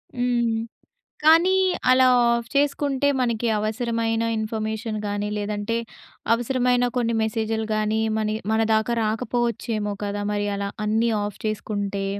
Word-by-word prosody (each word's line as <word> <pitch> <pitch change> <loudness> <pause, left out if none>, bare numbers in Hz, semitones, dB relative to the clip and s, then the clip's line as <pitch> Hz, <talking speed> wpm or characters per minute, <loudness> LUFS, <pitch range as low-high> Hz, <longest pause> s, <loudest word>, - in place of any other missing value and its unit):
హ్మ్. 240 -2 +1 0.7
కానీ 340 +4 +6 0.3
అలా 255 0 +6 0.3
ఆఫ్ 235 0 -3
చేసుకుంటే, 285 -1 +1
మనకి 235 -1 0
అవసరమైన 225 +1 -1 0.2
ఇన్ఫర్మేషన్ 220 0 -3
గాని, 205 0 -2
లేదంటే 205 +2 -2 0.6
అవసరమైన 245 +1 +1
కొన్ని 230 -1 +1
మెసేజులు 220 0 -1
గాని, 215 +1 0 0.2
మన 215 - 0
ఇ - - -4
మన 220 0 +2
దాకా 220 +2 +1
రాకపోవచ్చేమో 220 -1 -1
కదా! 205 0 -3
మరి 205 0 -1
అలా 200 0 -3 0.2
అన్నీ 225 +2 +2
ఆఫ్ 205 - -6
చేసుకుంటే. 205 -2 -3
225 Hz, 125 wpm, -23 LUFS, 215-240 Hz, 0.7 s, కానీ